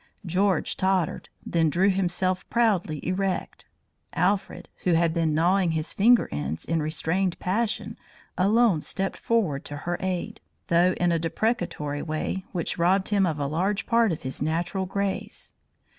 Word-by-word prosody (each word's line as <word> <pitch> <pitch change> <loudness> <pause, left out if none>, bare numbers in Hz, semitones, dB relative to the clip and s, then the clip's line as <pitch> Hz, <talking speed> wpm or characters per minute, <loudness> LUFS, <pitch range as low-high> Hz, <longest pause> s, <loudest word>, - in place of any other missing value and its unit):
George 185 0 +1
tottered, 190 -3 0 0.2
then 165 -2 +2
drew 190 +6 +3
himself 185 0 -1
proudly 195 -10 +1
erect. 185 0 -2 0.5
Alfred, 190 +3 0 0.2
who 180 - +2
had 165 0 +2
been 165 -2 +1
gnawing 175 +1 +2
his 155 0 -2
finger 235 +4 +4
ends 75 +2 -3
in 165 -1 0
restrained 170 +4 -1
passion, 215 +5 -2 0.4
alone 205 -2 +3
stepped 195 +4 -1
forward 190 -12 0
to 145 - -6
her 175 0 -1
aid, 185 -2 -3 0.3
though 175 +2 +4
in 175 -1 +1
a 165 - +1
deprecatory 165 -5 -2
way 155 +4 -3
which 175 -1 -3
robbed 190 +3 +2
him 200 -3 +3
of 160 -3 -2
a 145 - -1
large 185 +8 -1
part 230 -3 +3
of 160 - -4
his 130 0 -4
natural 170 +5 -1
grace. 200 0 -4
180 Hz, 150 wpm, -26 LUFS, 165-195 Hz, 0.5 s, finger